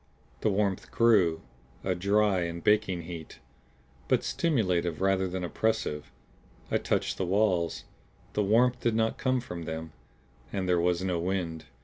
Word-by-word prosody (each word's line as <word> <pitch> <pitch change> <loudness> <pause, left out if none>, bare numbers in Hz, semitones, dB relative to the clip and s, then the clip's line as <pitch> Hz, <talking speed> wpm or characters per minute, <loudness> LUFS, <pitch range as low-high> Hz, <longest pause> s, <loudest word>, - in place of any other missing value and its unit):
The - - +1
warmth 100 -1 0
grew, 100 -9 +3 0.4
a - - +1
dry 100 +1 +2
and 85 0 -4
baking 95 -4 +2
heat; 80 -2 -8 0.7
but - - +2
stimulative 90 - 0
rather 95 0 +2
than 90 0 -4
oppressive. 90 -6 -1 0.6
I - - +2
touched - - -1
the 95 - 0
walls; 95 -3 +1 0.5
the 105 - +1
warmth 120 +5 +3
did 115 -2 0
not 110 0 0
come 130 -1 +1
from 85 -8 -7
them. 80 0 -5 0.6
And 95 -2 -2
there 90 -1 +3
was 90 +1 +1
no 90 -2 0
wind. 85 -3 -2
95 Hz, 145 wpm, -29 LUFS, 85-105 Hz, 0.7 s, grew